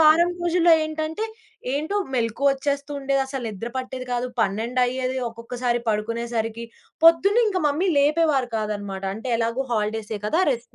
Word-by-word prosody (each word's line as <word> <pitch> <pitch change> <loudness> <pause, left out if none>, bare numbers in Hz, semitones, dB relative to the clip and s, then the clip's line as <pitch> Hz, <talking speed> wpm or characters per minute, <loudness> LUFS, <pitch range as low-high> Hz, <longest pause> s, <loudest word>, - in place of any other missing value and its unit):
వారం 320 +3 +6
రోజుల్లో 345 0 +4
ఏంటంటే, 315 +5 -3 0.5
ఏంటో 315 +8 -1 0.2
మెలుకువొచ్చేస్తూండేదసలు 275 +2 0
నిద్ర 220 +3 -6
పట్టేది 255 0 -5
కాదు. 245 +1 -1
పన్నెండయ్యేది 250 +5 0
ఒక్కొక్కసారి 240 +1 -2
పడుకునేసరికి, 230 +1 -2 0.4
పొద్దున్న 395 +8 +6
ఇంక 380 -3 -1
మమ్మీ 305 +6 +1
లేపేవారు 290 -3 +2
కాదన్నమాట. 205 -3 -3
అంటే 225 +3 -5
ఎలాగో 230 +3 0
హాలిడేసే 215 0 -2
కదా, 320 +11 +2
రెస్ట్ 240 -2 -4
255 Hz, 115 wpm, -24 LUFS, 230-305 Hz, 0.5 s, వారం